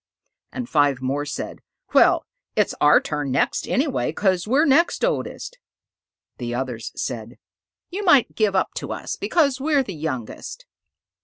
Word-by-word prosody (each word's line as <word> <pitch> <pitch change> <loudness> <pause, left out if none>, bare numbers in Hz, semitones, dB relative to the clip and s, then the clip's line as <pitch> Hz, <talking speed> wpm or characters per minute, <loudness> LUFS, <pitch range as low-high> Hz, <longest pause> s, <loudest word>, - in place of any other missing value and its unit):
And 250 -2 -5
five 145 - +2
more 140 +3 -2
said, 145 - -5 0.3
"Well, - - +5 0.3
it's - - +2
our 150 0 +7
turn 150 -2 -3
next 130 - 0
anyway, 275 +1 0
'cause 190 -2 0
we're 275 +7 +3
next 325 - +3
oldest." - - -3 0.8
The 120 -1 -3
others 120 -4 -4
said, 120 -1 -5 0.5
"You 400 +4 -4
might 285 - +5
give 215 -3 +1
up 190 - +1
to - - -4
us, - - -5
because 280 -6 +1
we're 290 -1 +2
the 200 - -7
youngest." 155 - -5
190 Hz, 145 wpm, -23 LUFS, -, 0.8 s, our